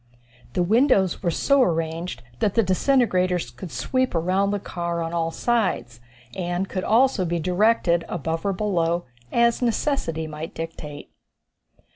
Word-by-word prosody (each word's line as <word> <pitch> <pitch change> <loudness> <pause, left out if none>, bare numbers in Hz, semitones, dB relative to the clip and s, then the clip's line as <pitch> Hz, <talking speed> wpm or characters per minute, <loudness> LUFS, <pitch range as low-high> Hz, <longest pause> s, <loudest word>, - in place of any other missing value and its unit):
The 180 - +1
windows 210 -2 +3
were 175 - +1
so 275 - +3
arranged 165 - -1 0.2
that 200 - +1
the 230 - +4
disintegrators 185 - +1
could 125 +9 -9
sweep 255 - -1
around 185 +4 +1
the 205 0 -1
car 170 -2 -3
on 165 +1 -4
all 165 -1 0
sides, 195 - -1 0.4
and 175 +1 -2
could 185 -1 -3
also 240 -2 +3
be 170 0 -1
directed 180 0 +2
above 165 0 -3
or 200 - +1
below, 175 -4 0 0.3
as 235 +1 +3
necessity 230 - 0
might 155 +1 -7
dictate. 155 -3 -7
180 Hz, 140 wpm, -24 LUFS, 165-215 Hz, 0.4 s, the